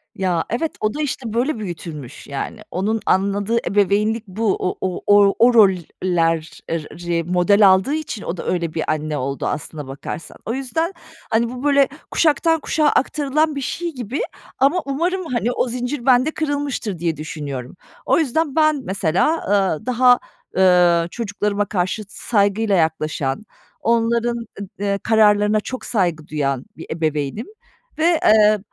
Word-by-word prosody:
Ya, 185 -5 0
evet, 305 +8 -1
o 215 +2 0
da 300 - -3
işte, 255 -6 -3
böyle, 245 +2 0
büyütülmüş, 160 - -7
yani. 145 +10 -5
Onun 210 +5 0
anladığı 200 +4 +1
ebeveynlik 210 +3 +1
bu. 205 +2 0
O 180 - -2
o 185 -2 -2
o, 205 -1 +6
o 240 +2 +6
rol 215 -4 +7 0.3
ler 165 -3 0
er 165 -1 -1
ri 170 +1 -3
model 180 +4 +4
aldığı 190 +9 +4
için 305 -9 -4
o 175 - -4
da - - -6
öyle 170 -3 -1
bir 160 - -1
anne 155 -1 -2
oldu 135 +1 -3
aslına 150 -2 -5
bakarsan. 140 +4 -7
O 225 - -2
yüzden, 320 +8 -2 0.4
hani, 230 +1 +1
bu, 250 +1 -7
böyle, 280 -2 +4 0.2
kuşaktan 325 +1 +2
kuşağa 305 0 +1
aktarılan 295 +2 +1
bir 280 - -3
şey 340 +4 -3
gibi 250 +2 -4 0.4
ama 280 +7 +3
umarım, 345 +7 -1
hani, 240 -5 -1
o 250 - 0
zincir 245 +2 -4
bende 260 +4 +4
kırılmıştır 285 - -2
diye 165 -3 -1
düşünüyorum. 145 -4 -6 0.3
O - - +3
yüzden 315 0 0
ben 310 -3 +3
mesela, 190 -5 +1 0.2
ııı, 195 -6 +1
daha, 250 0 +4 0.4
ııı, 175 -2 +5
çocuklarıma 205 -2 -1
karşı 185 +2 -2
saygıyla 205 0 +1
yaklaşan, 155 -1 -1 0.3
onların, 235 0 +1 0.4
ııı, 200 -1 0
kararlarına 210 -1 +4
çok 255 +4 -6
saygı 175 -8 -1
duyan 140 -4 -2
bir 160 - -8
ebeveynim 155 - -2 0.5
ve, 330 0 +3
eee, 215 -1 +5
210 Hz, 150 wpm, -20 LUFS, 175-255 Hz, 0.5 s, rol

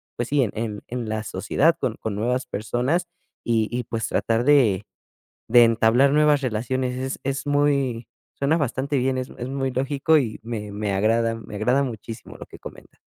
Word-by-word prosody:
pues, 120 - -3
sí, 145 -1 +3
en 105 -1 -3
en 120 -2 -4
la 110 0 -2
sociedad 140 - +1
con 115 - -1
con 110 -2 -3
nuevas 125 +5 -1
personas 125 - -1 0.4
y 115 -2 +1
y, 125 - -2
pues, 115 0 -3
tratar 115 +1 0
de 120 -9 +4 0.6
de 120 +1 +7
entablar 115 +4 +4
nuevas 150 -1 +4
relaciones. 125 +2 -1
Es 130 +1 -3
es 135 +1 -2
muy 140 -5 +1 0.3
suena 140 +3 +1
bastante 140 -1 -1
bien. 130 +1 0
Es 130 - -4
es 125 - -4
muy 135 0 -2
lógico 140 +4 +2
y 120 -7 -2
me 110 -3 -5
me 100 0 -2
agrada 115 +3 +2
me 110 -2 -9
agrada 125 +6 +2
muchísimo 115 -3 -7
lo - - -9
que - - -13
comentas. - - -12
125 Hz, 180 wpm, -23 LUFS, 110-135 Hz, 0.6 s, de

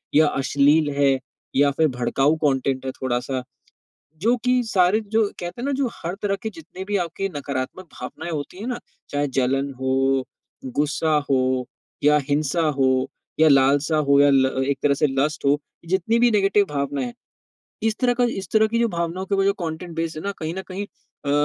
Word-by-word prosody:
या 155 +1 +6
अश्लील 145 +3 +3
है, 135 -2 +3 0.4
या 140 +1 +4
फ़िर 155 +3 +2
भड़काऊ 135 +3 +1
कॉन्टेन्ट 135 -2 +1
है 130 - -2
थोड़ा-सा। 130 0 -2 0.8
जो 235 +4 +3
कि 250 0 +3
सारे 190 0 +3
जो 220 +2 +2 0.2
कहते 175 +6 -6
हैं - - -4
ना 285 - 0
जो 265 - +2
हर 170 +2 -5
तरह 200 -1 0
के 220 - -3
जितने 180 +1 -9
भी 205 +1 -1
आपके 180 +2 -2
नकारात्मक 140 +5 -4
भावनाएँ 170 +2 -6
होती 155 +4 -5
है 220 - -5
ना? 245 -1 -2 0.3
चाहे 145 0 0
जलन 135 +2 +1
हो, 135 0 +1 0.4
गुस्सा 150 +4 0
हो, 130 -1 +1 0.4
या 150 0 +6
हिंसा 150 +3 +1 0.2
हो, 130 -1 +2 0.3
या 160 - +7
लालसा 140 +3 +4
हो 140 0 +6
या 145 0 +6
ल 130 0 +2
एक 140 -1 0
तरह 145 -1 +3
से 150 - +7
लस्ट 140 +3 -1
हो, 140 +1 +4 0.3
जितनी 190 +6 +1
भी 240 0 +5
नेगेटिव 200 -1 +3
भावनाएँ 140 -2 -2
है 120 - -7 0.7
इस 220 -1 +1
तरह 245 -1 +3
का 245 - +4
इस 195 -5 -3
तरह 220 0 +5
की 230 +2 -1
जो 235 - +3
भावनाओं 170 0 -3
के 200 - 0
वो 195 0 +2
जो 200 - +4
कॉन्टेन्ट 170 -2 -5
बेस 165 0 -2
है 155 - -5
ना, 200 - -2
कहीं 160 +1 -4
न 190 - -4
कहीं 195 +2 -4
अ, 145 -7 -10
155 Hz, 195 wpm, -23 LUFS, 135-195 Hz, 0.8 s, या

